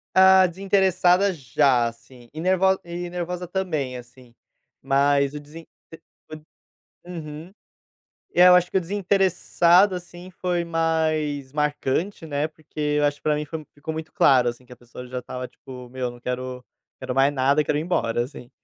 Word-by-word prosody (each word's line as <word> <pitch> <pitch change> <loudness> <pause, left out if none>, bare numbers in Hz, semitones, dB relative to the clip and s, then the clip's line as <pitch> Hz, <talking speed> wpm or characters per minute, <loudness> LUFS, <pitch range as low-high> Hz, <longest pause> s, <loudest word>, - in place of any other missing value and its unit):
Ah, 190 0 +7
desinteressada, 190 0 +2
já, 130 -3 +2
assim, 120 +1 -13
e 155 - -7
nervo 190 +1 +2
e 175 0 -6
nervosa 180 0 -4
também, 160 -9 -3
assim, 125 0 -15 0.5
mas 140 +1 +2
o 150 - -5
desin 155 +3 -12 0.3
t 165 - -12 1.1
um 180 - -8
uhum. 155 +1 -8 0.8
É, 180 +1 +7
eu 180 - +8
acho 180 0 +2
que - - +2
o - - +1
desinteressado, 190 0 +2
assim, 175 +1 -9
foi 175 -1 -2
mais 155 -4 -1
marcante 150 +5 -1
né, 145 -1 -1
porque 155 -1 -14 0.2
eu 145 - +3
acho 145 0 -1
pra 150 -1 +1
mim 150 0 -3
foi 160 0 -7
ficou 155 +2 -6
muito 160 0 -7
claro, 125 -3 +4
assim, 120 +2 -9
que 125 - -13
a - - -15
pessoa 125 +1 -12
já 125 0 -5
estava, 125 +1 -7
tipo: 125 -1 -12
"Meu 125 -1 -3
não 120 - -14
quero 125 +1 -5 0.4
quero 125 - -4
mais 135 +2 +3
nada, 140 +3 +2
eu - - -4
quero 150 - 0
ir - - -1
embora, 120 -9 0
assim". 125 -2 -11
155 Hz, 175 wpm, -23 LUFS, 130-175 Hz, 1.1 s, eu